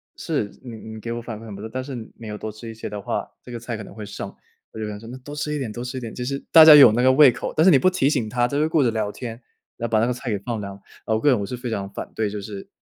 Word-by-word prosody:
是， 155 Hz, -10 st, -1 dB, 0.2 s
你 120 Hz, -3 st, -8 dB
你 110 Hz, 0 st, -9 dB
给 115 Hz, +2 st, -5 dB
我 120 Hz, 0 st, -3 dB
反 110 Hz, -2 st, -7 dB
馈 115 Hz, -, -11 dB
很 105 Hz, -3 st, -8 dB
不 100 Hz, -, -9 dB
错， 110 Hz, -, -6 dB
但 130 Hz, 0 st, -3 dB
是 135 Hz, 0 st, -6 dB, 0.2 s
没 115 Hz, -, -9 dB
有 105 Hz, 0 st, -5 dB
多 110 Hz, -, -5 dB
吃 110 Hz, +2 st, -10 dB
一 115 Hz, -, -7 dB
些 110 Hz, -, -7 dB
的 105 Hz, -, -5 dB
话， -, -, -3 dB
这 -, -, -11 dB
个 120 Hz, -, -5 dB
菜 115 Hz, -1 st, -5 dB
可 105 Hz, -, -7 dB
能 -, -, -12 dB
会 105 Hz, 0 st, -8 dB
剩。 100 Hz, -, -6 dB, 0.4 s
我 -, -, -9 dB
就 110 Hz, -, -3 dB
想 105 Hz, -1 st, -6 dB
说 115 Hz, +1 st, -11 dB
那 125 Hz, -, -7 dB
多 145 Hz, +3 st, -9 dB
吃 150 Hz, 0 st, -2 dB
一 -, -, -1 dB
点， 120 Hz, -5 st, -3 dB
多 120 Hz, +2 st, -6 dB
吃 125 Hz, +1 st, -5 dB
一 -, -, -2 dB
点。 115 Hz, -2 st, -7 dB
就 125 Hz, -, -5 dB
是 140 Hz, +2 st, -2 dB
大 160 Hz, -, +10 dB
家 155 Hz, -1 st, +11 dB
有 140 Hz, -6 st, +10 dB
那 115 Hz, +3 st, +1 dB
个 130 Hz, +1 st, +6 dB
胃 140 Hz, -1 st, +7 dB
口， -, -, -5 dB
但 160 Hz, -, +4 dB
是 185 Hz, -, +7 dB
你 140 Hz, -, +7 dB
不 185 Hz, -, +4 dB
提 145 Hz, -7 st, +1 dB
醒 125 Hz, -8 st, 0 dB
他， 120 Hz, +2 st, -2 dB
他 120 Hz, -, +4 dB
就 145 Hz, -, -1 dB
会 155 Hz, -, +2 dB
顾 160 Hz, -2 st, +2 dB
着 120 Hz, -, +2 dB
聊 110 Hz, -2 st, -1 dB
天， 120 Hz, +1 st, -6 dB, 0.5 s
然 115 Hz, -, -2 dB
后 -, -, -12 dB
把 110 Hz, -, +4 dB
那 115 Hz, -, +3 dB
个 125 Hz, -, 0 dB
菜 125 Hz, 0 st, -6 dB
给 105 Hz, -, 0 dB
放 115 Hz, +2 st, -4 dB
凉。 100 Hz, 0 st, -7 dB, 0.3 s
呃， 110 Hz, -, 0 dB
我 -, -, +1 dB
个 145 Hz, -, +3 dB
人 125 Hz, -5 st, +4 dB
我 100 Hz, -, -2 dB
是 125 Hz, -, -5 dB
非 125 Hz, 0 st, -5 dB
常 100 Hz, -2 st, -3 dB
反 -, -, -7 dB
对， 110 Hz, -2 st, 0 dB
就 105 Hz, +1 st, -5 dB
是， 100 Hz, 0 st, -8 dB
115 Hz, 395 characters per minute, -23 LUFS, 110-130 Hz, 0.5 s, 家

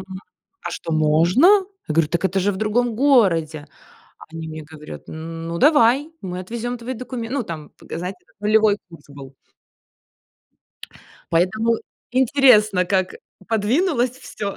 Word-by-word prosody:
м, 190 Hz, -, -9 dB, 0.6 s
а -, -, -4 dB
что 165 Hz, -, -5 dB
можно?" 160 Hz, -, +3 dB, 0.4 s
Я 155 Hz, -, -3 dB
говорю: 165 Hz, -2 st, +3 dB
"Так 170 Hz, +2 st, -2 dB
это 190 Hz, +1 st, +1 dB
же 205 Hz, +2 st, +1 dB
в 190 Hz, -, -6 dB
другом 220 Hz, +3 st, 0 dB
городе". 170 Hz, -, +2 dB, 0.5 s
А -, -, -12 dB
они 165 Hz, 0 st, -6 dB
мне 155 Hz, 0 st, -7 dB
говорят, 150 Hz, 0 st, -11 dB
н 165 Hz, +1 st, -7 dB
ну, 170 Hz, 0 st, -3 dB
давай, 290 Hz, +1 st, +4 dB
мы 180 Hz, -1 st, -5 dB
отвезём 235 Hz, +5 st, -5 dB
твои 250 Hz, +2 st, -5 dB
докуме 240 Hz, -1 st, -6 dB
ну, 275 Hz, -2 st, -1 dB
там 160 Hz, -6 st, -8 dB
показать, 180 Hz, +3 st, -6 dB, 0.3 s
нулевой 210 Hz, 0 st, +3 dB
курс 165 Hz, -4 st, -15 dB
был. 140 Hz, -1 st, -12 dB, 2.0 s
Поэтому 215 Hz, +7 st, +2 dB, 0.3 s
интересно, 240 Hz, -7 st, +4 dB
как 185 Hz, 0 st, 0 dB, 0.3 s
подвинулось 245 Hz, -, +1 dB
всё. 200 Hz, -5 st, -6 dB
200 Hz, 140 wpm, -21 LUFS, 165-235 Hz, 2.0 s, давай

